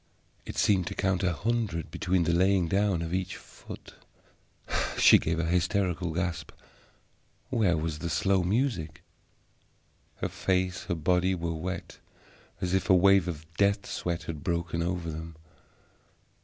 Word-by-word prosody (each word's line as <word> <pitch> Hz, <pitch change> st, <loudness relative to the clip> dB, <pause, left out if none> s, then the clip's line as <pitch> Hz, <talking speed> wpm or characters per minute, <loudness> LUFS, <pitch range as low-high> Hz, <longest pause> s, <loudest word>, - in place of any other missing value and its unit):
It -, -, -6 dB
seemed 95 Hz, -4 st, +3 dB
to -, -, -4 dB
count 95 Hz, -1 st, 0 dB
a 95 Hz, -2 st, +2 dB
hundred 105 Hz, -3 st, -2 dB
between 90 Hz, -1 st, +1 dB
the 85 Hz, +1 st, +1 dB
laying 95 Hz, 0 st, +3 dB
down 95 Hz, -1 st, +1 dB
of 85 Hz, +1 st, -4 dB
each 95 Hz, 0 st, -2 dB
foot. -, -, -12 dB, 1.0 s
She -, -, +8 dB
gave 85 Hz, +1 st, -1 dB
a 85 Hz, -, 0 dB
hysterical 90 Hz, 0 st, 0 dB
gasp. 85 Hz, +1 st, -3 dB, 1.0 s
Where 105 Hz, -9 st, +2 dB
was 80 Hz, -1 st, -3 dB
the 85 Hz, -, -3 dB
slow 95 Hz, +5 st, +2 dB
music? 90 Hz, -, -1 dB, 1.1 s
Her -, -, -3 dB
face, 95 Hz, 0 st, -1 dB
her 85 Hz, -, -1 dB
body, 90 Hz, +3 st, +2 dB
were 85 Hz, -1 st, -3 dB
wet 90 Hz, +3 st, -5 dB, 0.6 s
as 90 Hz, 0 st, -1 dB
if 95 Hz, +1 st, 0 dB
a 95 Hz, -, +7 dB
wave 95 Hz, 0 st, +5 dB
of 80 Hz, -3 st, -5 dB
death 100 Hz, 0 st, +2 dB
sweat 85 Hz, -1 st, -3 dB
had 75 Hz, -3 st, -6 dB
broken 85 Hz, -1 st, -1 dB
over 85 Hz, -1 st, -2 dB
them. 80 Hz, +1 st, -7 dB
90 Hz, 145 wpm, -28 LUFS, 85-95 Hz, 1.1 s, She